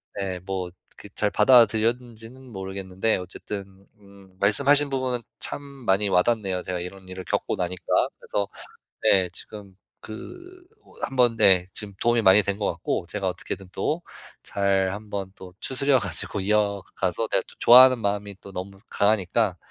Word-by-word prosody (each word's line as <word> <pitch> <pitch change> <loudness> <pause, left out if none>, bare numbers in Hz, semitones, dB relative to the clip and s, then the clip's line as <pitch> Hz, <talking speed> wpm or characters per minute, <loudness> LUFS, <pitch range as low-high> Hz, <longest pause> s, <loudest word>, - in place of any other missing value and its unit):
네 95 -2 -3
뭐 95 -1 -4 0.3
그 - - -10
잘 105 - +1
받아들였는지는 120 +1 +2
모르겠는데 95 +1 -2
어쨌든 95 +1 -8
음 100 -2 -18
말씀하신 140 +8 +4
부분은 130 -3 -2 0.2
참 - - -2
많이 110 -8 -1
와닿네요, 95 -1 +1
제가 90 -1 -3
이런 95 +1 -8
일을 95 0 -7
겪고 - - -1
나니까. 90 0 -4 0.4
그래서 100 -1 -2 0.6
네 95 -2 +4
지금 100 -3 -10 0.2
그 110 - -9 0.7
뭐 - - -21
한번 125 -3 +2
네 90 -4 +5
지금 105 -2 -5
도움이 120 0 +3
많이 95 +2 +6
된 100 +1 -1
것 105 - -1
같고, 85 +1 -3
제가 100 -1 -2
어떻게든 95 +1 -6
또 155 - -2 0.4
잘 95 -1 0
한번 100 -2 -5
또 90 -1 -11
추스려 135 0 +2
가지고 105 - -4
이어가서 100 0 -1
내가 - - +2
또 - - -16
좋아하는 130 +1 +8
마음이 100 -1 -2
또 100 - -12
너무 95 +1 -6 0.2
강하니까 100 -1 +1
100 Hz, 320 characters per minute, -25 LUFS, 95-115 Hz, 0.7 s, 좋아하는